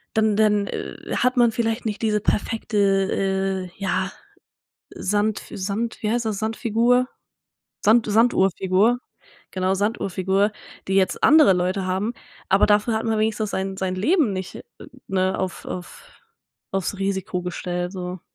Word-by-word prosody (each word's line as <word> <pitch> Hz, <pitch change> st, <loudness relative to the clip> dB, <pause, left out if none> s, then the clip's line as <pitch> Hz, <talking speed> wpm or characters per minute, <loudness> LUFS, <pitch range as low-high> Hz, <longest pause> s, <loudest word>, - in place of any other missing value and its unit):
dann 220 Hz, -1 st, +3 dB
dann, 210 Hz, -1 st, +3 dB
äh, -, -, -6 dB
hat 250 Hz, +1 st, +1 dB
man 240 Hz, -1 st, +5 dB
vielleicht 225 Hz, +1 st, -1 dB
nicht 210 Hz, -1 st, -3 dB
diese 215 Hz, -2 st, +1 dB
perfekte, 220 Hz, 0 st, -1 dB, 0.9 s
äh, -, -, -23 dB
ja 190 Hz, 0 st, -1 dB, 0.8 s
Sandf 210 Hz, +2 st, -1 dB
Sand 205 Hz, +4 st, -3 dB
wie 215 Hz, -, 0 dB
heißt 240 Hz, -1 st, 0 dB
das, 210 Hz, -3 st, -2 dB
Sandfigur? 230 Hz, +3 st, +1 dB, 0.8 s
Sand 220 Hz, +2 st, +5 dB
Sanduhrfigur, 205 Hz, 0 st, +3 dB, 0.5 s
genau 185 Hz, 0 st, 0 dB
Sanduhrfigur, 195 Hz, -1 st, 0 dB, 0.4 s
die 195 Hz, -, 0 dB
jetzt 190 Hz, -1 st, +1 dB
andere 305 Hz, -5 st, +7 dB
Leute 185 Hz, +2 st, -1 dB
haben, 190 Hz, +5 st, -1 dB, 0.4 s
aber 195 Hz, -, +5 dB
dafür 210 Hz, +2 st, +3 dB
hat 220 Hz, -, -2 dB
man 220 Hz, -1 st, 0 dB
wenigstens 215 Hz, -1 st, 0 dB
sein 190 Hz, 0 st, -2 dB
sein 185 Hz, -1 st, -2 dB
Leben 260 Hz, -, +2 dB
nicht, 185 Hz, -1 st, -6 dB, 0.4 s
ne, 190 Hz, -1 st, 0 dB
auf 185 Hz, -1 st, -4 dB
auf 180 Hz, -1 st, -8 dB, 0.6 s
auf's 195 Hz, +1 st, -2 dB
Risiko 190 Hz, -2 st, -2 dB
gestellt 180 Hz, 0 st, -3 dB
so. 180 Hz, -1 st, -6 dB
205 Hz, 135 wpm, -23 LUFS, 190-220 Hz, 0.9 s, andere